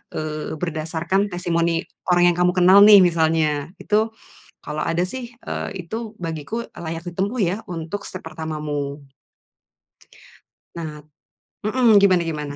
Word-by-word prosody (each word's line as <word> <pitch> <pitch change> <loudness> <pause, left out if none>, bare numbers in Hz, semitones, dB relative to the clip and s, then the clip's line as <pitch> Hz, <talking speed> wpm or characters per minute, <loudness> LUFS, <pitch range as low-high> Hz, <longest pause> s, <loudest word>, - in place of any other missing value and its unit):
eee, 155 0 -4
berdasarkan 165 +4 -1
testimoni 170 -1 0 0.3
orang 175 0 +5
yang - - -8
kamu 180 0 +4
kenal 185 +2 +7
nih 205 -1 +9
misalnya, 160 -4 +1
itu 215 +1 +2 0.6
kalau 150 +1 -3
ada 165 +1 0
sih, 245 +3 -7 0.2
eee, 190 -4 -4
itu 225 +3 -5
bagiku 165 +8 -4
layak 165 -1 -6
ditempuh 195 +8 -2
ya 185 +1 +1
untuk 165 +4 -5
step 185 - -7
pertamamu. 150 -3 -4 1.8
Nat 155 -3 -7 0.6
mhm, 230 -2 +5
gimana 185 -3 +4
gimana? 150 -3 -4
170 Hz, 125 wpm, -22 LUFS, 155-195 Hz, 1.8 s, nih